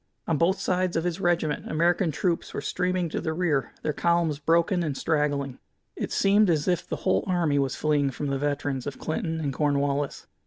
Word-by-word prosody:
On 165 - +2
both 185 +4 +2
sides 185 -1 0
of 165 - 0
his 175 +1 -2
regiment 170 -4 0
American 170 +2 +2
troops 170 +3 -1
were - - -1
streaming 180 -1 -1
to - - -3
the 160 - -2
rear, 160 -5 0
their 150 - 0
columns 170 -2 +1
broken 170 +4 +2
and 150 -5 -2
straggling. 145 -4 0 0.4
It - - -4
seemed 200 0 +4
as 155 -3 +1
if 180 -2 0
the - - -2
whole - - +3
army 170 -6 +2
was 135 -2 0
fleeing 145 -2 +1
from 140 +2 -5
the 140 -1 -1
veterans 145 -2 -2
of 140 - -5
Clinton 160 +1 -2
and 145 -3 -2
Cornwallis. 145 0 0
160 Hz, 195 wpm, -26 LUFS, 145-175 Hz, 0.4 s, seemed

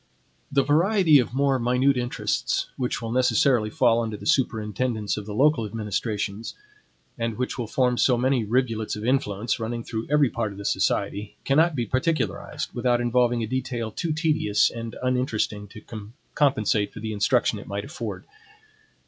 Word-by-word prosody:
The 140 -1 +3
variety 165 +1 +4
of 120 0 -2
more 135 -1 +2
minute 125 +3 +2
interests, 125 -1 -1
which 125 -2 -2
will 115 - -3
necessarily 125 -2 +3
fall 115 +1 +3
under 110 -2 -3
the - - -11
superintendence 110 -5 0
of 105 -1 -7
the 105 - -5
local 140 -1 +3
administrations, 105 0 -3 0.6
and 115 -2 -2
which 125 +1 -3
will 120 - -2
form 125 +1 +1
so 125 -2 +4
many 130 0 +1
rivulets 115 -1 0
of 105 +1 -6
influence, 120 -5 0
running 115 +1 -3
through 110 -1 -5
every 145 -3 +3
part 110 -3 -2
of - - -13
the 100 - -8
society, 100 +1 -1
cannot 155 +4 +3
be 120 -3 -1
particularized, 130 +8 -2
without 120 0 +1
involving 120 -1 +2
a - - -3
detail 120 -2 -3
too 165 +9 -3
tedious 155 -10 +2
and 115 -1 -6
uninteresting 120 -5 -1
to 105 +2 -13 0.5
compensate 110 -8 +2
for - - -8
the 110 0 -4
instruction 100 -1 +1
it - - -11
might 100 +1 -4
afford. 155 +5 -6
120 Hz, 165 wpm, -25 LUFS, 110-130 Hz, 0.6 s, variety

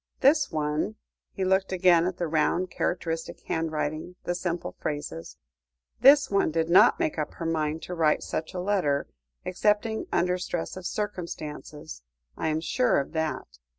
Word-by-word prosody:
This 285 +1 +4
one" 155 +6 -1 0.4
he 190 - -2
looked 190 +1 +2
again 180 -2 +4
at 185 -1 -3
the 175 - -1
round, 165 +3 +1
characteristic 165 -2 -2
handwriting, 160 +1 -3
the 175 - -1
simple 175 -1 -3
phrases 145 - -5 0.6
"this 285 -1 +6
one 200 -4 +3
did 165 +1 -1
not 180 - +6
make 155 - -1
up 150 - -3
her 165 - -5
mind 160 -1 -1
to 180 - -5
write 160 -3 +2
such 160 +4 -4
a - - -2
letter, 180 -7 +1 0.4
excepting 210 +4 0
under 180 +1 +1
stress 175 -2 -3
of 185 -1 -5
circumstances, 155 - -6 0.3
I - - -2
am 155 0 0
sure 250 - +2
of 140 - -4
that. 160 - -3
170 Hz, 155 wpm, -27 LUFS, 155-185 Hz, 0.6 s, this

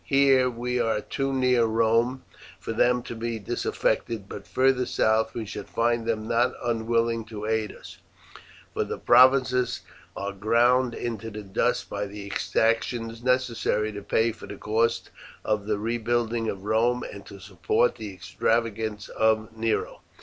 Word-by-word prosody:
Here 135 -2 +4
we 125 +1 -2
are 110 -2 +1
too 135 +5 -3
near 125 -3 +3
Rome 115 +3 +1 0.4
for 115 - -5
them 125 +2 +2
to - - -7
be 115 0 -3
disaffected, 105 +1 -2
but - - -9
further 130 -1 +2
south 110 0 +1
we 115 - -3
shall 100 0 -7
find 115 0 0
them 110 -1 -1
not 120 +2 +2
unwilling 115 0 0
to 110 -1 -7
aid 110 -1 0
us, - - -13 0.7
for - - 0
the - - -5
provinces 125 0 +4 0.4
are 100 0 -3
ground 120 +4 +2
into 115 -2 -4
the 105 0 -7
dust 95 -1 0
by 105 - -3
the 100 0 -8
exactions 115 +3 -1
necessary 120 -4 +1
to 100 -1 -7
pay 110 +3 +1
for 115 - -11
the - - -8
cost 115 +2 0 0.3
of 105 -1 -1
the 105 -1 0
rebuilding 115 +1 -1
of 95 -1 -5
Rome 120 +3 +2
and 100 - -8
to 100 - -11
support 100 +4 0
the 110 -3 -6
extravagance 110 +3 -1
of 110 0 0
Nero." 110 0 -2
115 Hz, 155 wpm, -26 LUFS, 110-120 Hz, 0.7 s, Here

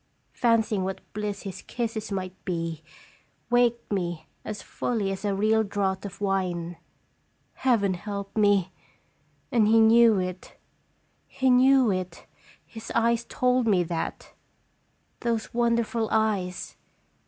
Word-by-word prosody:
Fancy 230 -3 +2
ing 190 - -1
what 190 0 -4
bliss 210 -1 -4
his 195 -1 -7
kisses 220 -3 -4
might 185 -2 -3
be, 165 -3 -3 0.7
waked 240 -2 +2
me 175 -5 -2 0.2
as 210 -2 -6
fully 210 -5 -2
as 195 +1 -5
a 200 -1 0
real 215 +2 +3
draught 195 -2 -2
of 200 -1 -8
wine. 180 -4 -1 0.8
Heaven 225 -7 +2
help 200 +1 -6
me! 205 -4 +3 0.8
And 230 -5 +4
he 225 +1 +5
knew 225 -1 +6
it 185 0 -5 0.7
he 260 -1 +1
knew 255 -2 +5
it; 185 -2 -4 0.4
his 225 -1 -9
eyes 235 0 +2
told 250 -1 +1
me 190 -5 +3
that. 165 -1 -5 0.9
Those 230 -2 -2
wonderful 235 -2 +1
eyes! 205 -5 -1
205 Hz, 125 wpm, -26 LUFS, 190-230 Hz, 0.9 s, knew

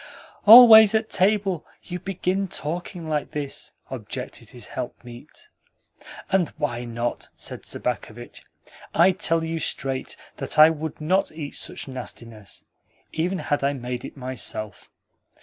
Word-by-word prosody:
"Always 220 -2 +10
at 220 0 0
table 195 -3 +1 0.2
you 180 0 -6
begin 195 +1 -2
talking 170 +1 -5
like 150 -2 -2
this!" 145 -2 -5 0.2
objected 125 -1 -7
his 120 -3 -11
helpmeet. 125 - -9 0.8
"And 190 -4 +2
why 125 -6 -3
not?" 120 0 -4
said - - -6
Sobakevitch. - - -5 0.5
"I 175 +3 +6
tell 165 -4 0
you 165 0 -3
straight 135 -3 -3 0.2
that - - -2
I 155 +1 +9
would 160 0 -6
not 185 +6 +1
eat 155 -2 -7
such - - -4
nastiness, 115 -5 -8 0.5
even 175 +4 -1
had 145 -5 -2
I 140 +1 +1
made 125 -2 -5
it - - -9
myself. 115 -6 -4
155 Hz, 130 wpm, -24 LUFS, 125-185 Hz, 0.8 s, Always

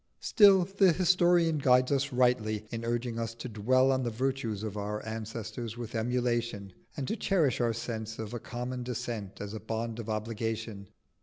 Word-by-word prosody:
Still 200 -4 +6
the 195 -1 +4
historian 175 -2 +3
guides 125 -1 +4
us 140 0 +1
rightly 120 -4 +1
in 115 -1 -4
urging 120 0 -2
us 115 0 -3
to 115 +2 -6
dwell 130 +4 +3
on 130 0 +1
the 120 - -1
virtues 115 -3 -2
of 105 -2 -4
our 105 +1 -4
ancestors 110 +1 -5
with 120 -2 -6
emulation, 120 -4 -1 0.2
and 135 -3 -3
to - - -1
cherish 165 - +1
our 120 -1 +2
sense 115 -1 -5
of 110 0 -6
a 120 - -3
common 125 +3 -5
descent 120 -5 -5
as 105 0 -6
a 110 - -5
bond 115 +1 -4
of 115 -1 -6
obligation. 110 -2 -3
120 Hz, 175 wpm, -30 LUFS, 110-130 Hz, 0.2 s, Still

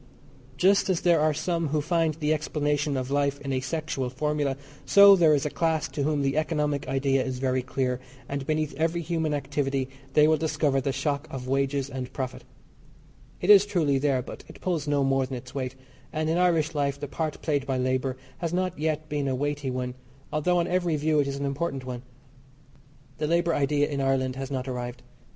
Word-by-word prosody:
Just 195 +3 +4
as 180 -3 +1
there 170 -2 +4
are 155 +1 +3
some 165 +2 -1
who 150 +1 0
find 165 0 +1
the 155 -1 +1
explanation 150 -1 -1
of 130 +1 -3
life 140 0 +1
in 140 -1 -3
a 130 - +1
sexual 135 -1 -3
formula, 145 0 -1 0.3
so 200 0 +8
there 165 -5 +5
is 140 - -1
a 150 - -1
class 160 -2 0
to 145 - -4
whom 145 0 +1
the 135 +2 0
economic 150 -3 0
idea 135 0 +1
is 130 -1 -3
very 130 0 0
dear, 125 0 -1 0.3
and 140 -1 -4
beneath 155 -1 0
every 165 +2 0
human 160 -1 -1
activity 140 -2 -1 0.3
they 150 0 +6
will 155 0 +4
discover 150 -3 +1
the 135 +1 -1
shock 140 +2 -2
of 130 -1 -6
wages 135 0 0
and 130 -2 -6
profit. 130 -2 -4 1.0
It - - +5
is 200 -1 +9
truly 160 -9 +1
there, 135 -3 +1
but - - -9
it - - -13
pulls 165 -5 -2
no 145 -1 +2
more 135 -1 +2
than 130 -1 -4
its 130 +1 -11
weight, 130 -2 -3 0.4
and 155 0 -1
in 165 - +1
Irish 165 -3 +2
life 140 -2 -1
the 145 - -4
part 155 +2 -3
played 145 -4 0
by 135 -1 0
labour 130 0 0 0.2
has 170 -2 -2
not 185 -3 -1
yet 155 0 -1
been 145 -2 -2
a 130 - 0
weighty 145 0 -2
one; 125 0 -3 0.4
although 175 +4 +2
on 170 - +2
every 175 -2 +1
view 150 +1 +2
it 140 - +2
is 140 - -2
an 140 0 -3
important 140 -1 -2
one. 125 -1 -5 1.2
The 150 - 0
labour 170 +1 +2
idea 145 0 +2
in 140 -2 -2
Ireland 130 -1 +1
has 135 0 -5
not 130 -1 -3
arrived. 125 -1 -5
145 Hz, 205 wpm, -26 LUFS, 135-155 Hz, 1.2 s, is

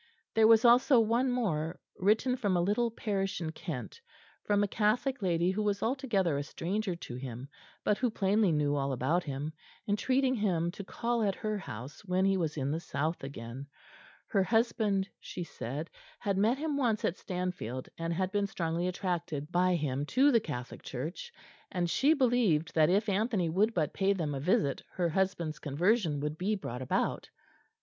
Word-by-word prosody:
There 220 0 +5
was 225 +1 +6
also 245 +2 +6
one 230 +4 +2
more, 175 -10 -1 0.2
written 220 +6 +2
from 205 -8 +1
a - - +2
little 215 +5 +1
parish 200 -3 -2
in 160 -2 -3
Kent, 160 - -6 0.4
from 205 0 +2
a - - +1
Catholic 235 +6 +1
lady 175 -1 +2
who 205 +3 -1
was 205 -1 0
altogether 225 - +1
a - - -2
stranger 185 +6 -2
to 170 - -8
him, 125 0 -6 0.4
but 210 - +1
who 250 - +2
plainly 205 -2 +2
knew 145 -2 +1
all 135 -1 0
about 145 +8 +1
him, 145 +2 -4 0.3
entreating 255 +6 +2
him 180 -7 0
to 200 - -8
call 235 +4 -1
at 200 -3 +1
her 215 -1 -2
house 130 - -8
when 185 -1 +1
he 195 0 +3
was 160 -5 -1
in 140 0 -1
the 160 - -1
south 155 0 -2
again; 135 0 -7 0.6
her 195 - +3
husband, 215 -2 +1
she 180 - -6
said, 150 0 -5 0.3
had 200 -1 -1
met 220 +6 +3
him 300 -1 -2
once 235 -6 +1
at 175 - -1
Stanfield 180 - -4
and 165 0 -3
had 185 +2 -1
been 205 0 +1
strongly 170 -1 -2
attracted 175 -5 -3
by 180 0 +3
him 145 -4 -1
to 275 - +4
the 235 - +5
Catholic 125 -7 -6
Church, 160 - -6 0.4
and 175 -2 0
she 285 - +3
believed 235 - +2
that 155 -1 +4
if 205 +4 +2
Anthony 200 -3 +1
would 210 +6 +2
but 155 -4 0
pay 195 0 +2
them 160 -6 -2
a 135 - -3
visit 140 -2 +1
her 175 -2 0
husband's 175 -3 -1
conversion 160 - +1
would 150 +1 -3
be 205 +4 +1
brought 125 - -5
about. 130 - -1
185 Hz, 180 wpm, -31 LUFS, 155-215 Hz, 0.6 s, was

